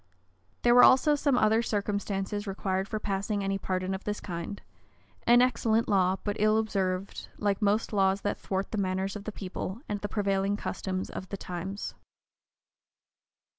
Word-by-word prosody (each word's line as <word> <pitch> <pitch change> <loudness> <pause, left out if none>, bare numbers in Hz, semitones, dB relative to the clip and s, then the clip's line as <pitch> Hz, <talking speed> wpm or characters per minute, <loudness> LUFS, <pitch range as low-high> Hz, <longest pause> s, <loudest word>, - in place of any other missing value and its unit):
[*] 95 +2 -40
There 240 - +5
were 245 - +8
also 265 +4 +6
some 285 -3 +2
other 220 0 +4
circumstances 205 -1 -2
required 190 0 -1
for 215 - -3
passing 200 0 -2
any 195 0 -1
pardon 185 0 -2
of 190 - -5
this 210 0 -3
kind: 175 +2 -5 0.7
an 240 +1 +7
excellent 230 -2 +2
law, 190 -2 +3
but 205 -1 -2
ill 215 +1 +4
observed, 195 -3 -2
like 205 -1 0
most 210 +2 +1
laws 195 -1 +2
that 205 - -2
thwart 190 0 -3
the 215 - -1
manners 190 +1 -1
of 205 -1 -7
the 215 - -3
people, 190 +1 -5
and 205 -1 -3
the 205 - -3
prevailing 200 -1 0
customs 190 -2 -4
of 185 - -7
the 200 - -4
times. 190 +3 -5
200 Hz, 170 wpm, -29 LUFS, 190-215 Hz, 0.7 s, were